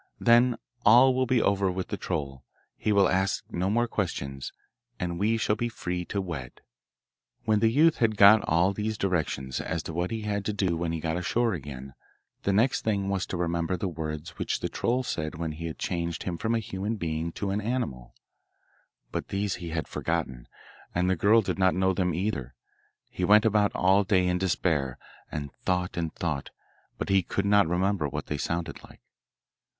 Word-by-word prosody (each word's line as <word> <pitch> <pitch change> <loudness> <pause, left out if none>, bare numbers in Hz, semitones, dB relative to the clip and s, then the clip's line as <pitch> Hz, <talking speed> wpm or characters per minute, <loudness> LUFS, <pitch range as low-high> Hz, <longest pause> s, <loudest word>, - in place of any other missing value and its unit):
Then 120 0 +5 0.3
all 125 +5 +7
will 130 0 +1
be 125 -1 +3
over 100 -1 +2
with 95 0 -4
the - - -2
troll; 70 -4 -4 0.3
he 105 - -1
will 100 -2 +5
ask 95 +1 0
no 90 +2 -1
more 120 +3 +2
questions, 70 -11 -3 0.5
and 85 -1 -3
we 110 +3 +2
shall 105 -1 +1
be 120 +2 -2
free 90 -5 -4
to 100 - -3
wed.' 80 -10 -6 0.8
When 110 -1 +3
the 110 +1 +4
youth 155 +7 +4
had 110 -3 +1
got 105 +2 +8
all 85 +4 +3
these 110 +1 -2
directions 75 -9 -1
as 80 -1 -3
to 80 - -6
what 90 +2 -1
he 110 -1 -3
had 105 -1 -2
to 105 - -1
do 95 -4 0
when 85 0 -2
he 80 - -2
got 80 +1 -2
ashore 115 +6 +1
again 70 -4 -7 0.5
the 100 - 0
next 115 +6 +2
thing 100 -3 0
was 95 -2 -1
to 90 - -3
remember 85 +1 -1
the 95 - -2
words 75 -2 -5
which - - -1
the - - -2
troll 125 +2 0
said 80 -9 -3
when 80 0 -3
he 80 +1 -5
changed 85 -2 -3
him 90 - -3
from 115 +7 -1
a - - +3
human 105 +1 -3
being 80 -3 -3
to 100 -1 -3
an 100 +2 -1
animal; 105 - -3 1.0
but - - -3
these 100 0 -2
he 85 - -5
had 80 -1 -3
forgotten, 70 -8 -3 0.5
and 90 +1 +2
the - - +2
girl 105 +6 +5
did - - -3
not 95 -1 +4
know 95 +1 +2
them 90 -1 0
either. 85 - -3 0.6
He 90 - -4
went 105 +4 +6
about 105 -2 +3
all 95 +2 +4
day 95 -2 +2
in 90 0 +1
despair, 80 -8 0 0.3
and 70 -2 -5
thought 90 -1 0
and 80 -2 -2
thought, 80 -5 -3 0.5
but - - -4
he 95 -1 +4
could 100 +3 -2
not 100 -3 +4
remember 90 -2 +1
what 75 +1 -4
they 75 - -3
sounded 85 +3 -3
like. - - -16
95 Hz, 195 wpm, -27 LUFS, 80-105 Hz, 1.0 s, got